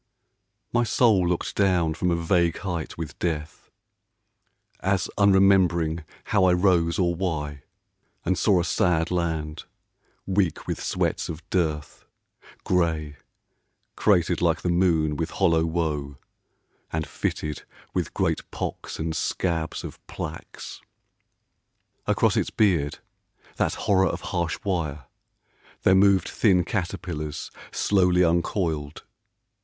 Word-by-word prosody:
MY 120 0 +3
soul 105 -5 +3
looked 90 - -1
down 90 -5 +2
from 90 +3 -1
a 85 - +2
vague 85 0 +1
height 85 -6 -4
with 80 -2 -6
Death, 80 -3 -3 1.1
As 95 -1 0
unremembering 95 -5 +4 0.2
how 95 - +2
I 90 - +5
rose 90 -2 +3
or 85 -2 +2
why, 75 -5 -3 0.6
And 95 +2 +2
saw 90 +2 +3
a 85 - 0
sad 85 -2 +1
land, 80 -3 -2 0.6
weak 95 -4 0
with - - -3
sweats - - -1
of 80 +2 -7
dearth, 80 -5 -1 0.6
Gray, 80 -5 0 0.8
cratered 90 -5 +2
like 85 -2 +2
the 90 - 0
moon 80 -4 +2
with 80 +1 -2
hollow 85 -4 +2
woe, 75 -4 -2 0.7
And 80 0 -1
fitted 75 -1 -3 0.3
with - - -2
great - - -1
pocks - - -5
and 80 0 -3
scabs 80 -3 -1
of - - -9
plaques. 80 +1 -7 1.3
Across - - +2
its - - +1
beard, 85 -9 +1 0.6
that - - +1
horror 95 -1 +2
of - - -3
harsh 85 -2 0
wire, 80 - -2 0.8
There 95 - +5
moved 95 0 +4
thin 95 -5 +3
caterpillars, 85 -5 -4 0.2
slowly 90 -3 +3
uncoiled. 85 -3 -1
85 Hz, 115 wpm, -25 LUFS, 80-95 Hz, 1.3 s, I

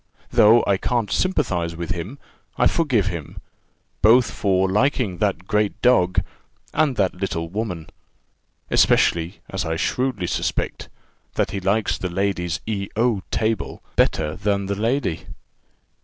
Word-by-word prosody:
Though 115 +3 +6
I 100 - +2
can't 120 +1 -1
sympathize 90 - 0
with 85 0 -5
him, 95 +10 -4 0.4
I - - +3
forgive 145 - +2
him, 85 -7 -5 0.6
both 115 +1 +5
for 95 -2 +1
liking 105 - +1
that 95 -3 0
great 105 0 0
dog, 95 -8 +4 0.5
and 150 -5 +2
that 95 -4 +1
little 85 -3 -3
woman; 90 -5 -4 0.8
especially, 85 +3 +3
as 95 +2 -2
I 80 0 -2
shrewdly 125 +3 -1
suspect, - - -2 0.5
that - - 0
he 100 - -3
likes 100 +2 0
the 90 - -3
lady's 90 -1 -1
E 100 -3 -2
O 115 -3 +1
table 110 -1 -2
better 75 0 +1
than 100 -1 -1
the 100 - -1
lady." 110 - -1
100 Hz, 135 wpm, -22 LUFS, 90-110 Hz, 0.8 s, Though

